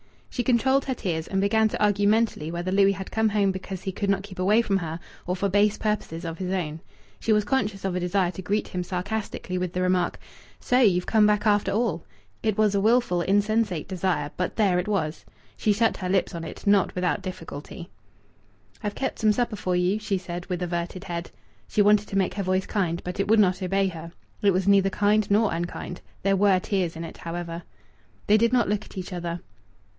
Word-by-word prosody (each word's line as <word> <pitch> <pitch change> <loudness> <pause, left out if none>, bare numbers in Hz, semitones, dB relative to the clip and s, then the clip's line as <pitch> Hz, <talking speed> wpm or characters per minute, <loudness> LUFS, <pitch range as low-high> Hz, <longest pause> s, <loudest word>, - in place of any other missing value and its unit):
She 250 - -1
controlled 265 +3 +2
her 260 - -1
tears, 165 -7 -3
and 195 - -1
began 220 +2 +3
to 215 - -2
argue 205 -1 +3
mentally 215 -7 +1
whether 175 +2 -3
Louis 200 0 +4
had 190 0 -7
come 220 0 +2
home 200 -2 +2
because 190 0 -6
he 190 - -2
could 200 +2 -2
not 195 0 +1
keep 195 -2 -11
away 210 +5 +4
from 195 -3 +1
her, 165 -2 -4 0.3
or 180 - 0
for 200 +2 0
base 205 +2 +3
purposes 190 -6 -2
of 165 0 -5
his 185 -1 -3
own. 165 -5 -2 0.4
She 225 - +2
was 210 0 +3
conscious 205 -4 -1
of 190 - 0
a - - 0
desire 180 0 +1
to 185 - -7
greet 205 +3 -1
him 180 - -3
sarcastically 185 +1 -3
with 180 -1 -3
the 180 - -1
remark, 180 -1 +1 0.4
"So 250 - +2
you've 185 -7 +4
come 215 -2 +4
back, 210 0 +1
after 205 -1 +3
all!" 205 -7 0 0.4
It 215 -2 0
was 215 -2 +3
a 200 - +2
wilful, 225 -5 +3
insensate 205 -1 +1
desire; 175 -6 -1
but 180 - -2
there 195 -5 +3
it 180 - -3
was. 170 -7 -1 0.3
She 210 - +2
shut 225 +2 +1
her 185 -2 -4
lips 190 0 +1
on 170 -1 -5
it, - - -9
not 200 -2 +3
without 180 +2 0
difficulty. 170 -2 -8 0.9
"I've 205 -2 -3
kept 265 - -3
some 215 -2 +4
supper 235 -1 -1
for 180 -1 -1
you," 180 +4 +1
she 205 -2 -1
said, 175 -1 -6
with 180 -1 -2
averted 175 +1 -3
head. 170 -3 -5 0.4
She 210 - +1
wanted 210 0 +4
to 195 - -2
make 190 -2 +1
her 200 - -2
voice 185 0 0
kind, 175 -4 -1
but 180 +2 -5
it 195 - +1
would 220 +2 +5
not 185 -2 +3
obey 195 +1 +1
her. 165 -1 -9 0.3
It 200 - +4
was 185 +1 0
neither 195 -1 +5
kind 205 +2 +2
nor 210 +1 +3
unkind. 175 +1 -5 0.2
There 195 0 +3
were 195 -1 +4
tears 180 -3 -1
in 165 - -5
it, 165 - -8
however. 170 0 -5 0.6
They 210 - +5
did 235 +2 +2
not 240 -6 +3
look 210 +1 -1
at - - -14
each 185 0 -5
other. 175 -1 -4
195 Hz, 220 wpm, -25 LUFS, 180-210 Hz, 0.9 s, would